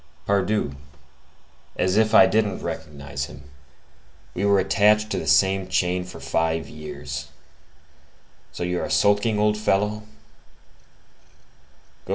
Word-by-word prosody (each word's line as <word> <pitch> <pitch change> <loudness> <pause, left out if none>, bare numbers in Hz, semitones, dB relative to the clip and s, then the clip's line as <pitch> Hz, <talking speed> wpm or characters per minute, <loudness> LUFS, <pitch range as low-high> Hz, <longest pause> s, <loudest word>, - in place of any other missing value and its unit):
"Pardieu, 100 -5 0 1.0
as 90 +1 0
if 110 0 +3
I - - +9
didn't 105 0 0
recognize 70 -3 -5
him! 70 -1 -13 0.9
We 95 - -3
were 100 0 +4
attached 105 +3 +3
to - - -1
the - - -6
same 95 -1 +3
chain 90 0 0
for 90 - -10
five 80 0 -1
years. 75 0 -7 1.2
So - - -5
you 90 0 -1
are - - -4
sulking, 105 +2 +2
old 105 0 +1
fellow?" 105 +1 0
95 Hz, 115 wpm, -23 LUFS, 90-105 Hz, 1.2 s, I